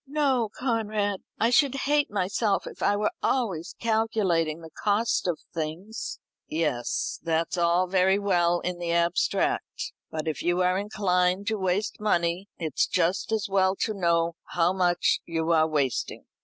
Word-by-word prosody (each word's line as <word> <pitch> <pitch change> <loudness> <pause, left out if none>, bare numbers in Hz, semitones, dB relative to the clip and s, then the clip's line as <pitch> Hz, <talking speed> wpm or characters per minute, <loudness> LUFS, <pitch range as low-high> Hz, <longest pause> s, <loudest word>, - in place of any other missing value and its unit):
"No, 270 -6 +1
Conrad; 215 -5 -1 0.2
I 230 +2 +3
should 275 +1 +4
hate 290 0 +2
myself 200 +1 0
if - - -10
I 205 - +3
were 210 +1 0
always 195 -11 -1
calculating 210 -8 +1
the 160 -1 -11
cost 210 +3 0
of 175 -3 0 0.2
things." 165 +8 -5 0.3
"Yes, 150 -7 -1
that's 165 +1 0
all 175 +1 +3
very 190 +1 +3
well 175 -4 +2
in 180 -1 -3
the 170 -1 -2
abstract. 175 - 0 0.2
But 155 0 -4
if 155 - -2
you 175 +1 +1
are 180 +1 +2
inclined 190 -2 +1
to 220 -1 -1
waste 190 +2 -1
money, 180 -2 0
it's 160 -5 0
just 180 +4 0
as 220 -2 0
well 190 -1 +2
to 220 - 0
know 170 -3 +1
how 175 +1 +1
much 175 -2 +2
you 165 0 -1
are 160 -1 +4
wasting. 145 -5 -1
185 Hz, 155 wpm, -26 LUFS, 170-210 Hz, 0.3 s, should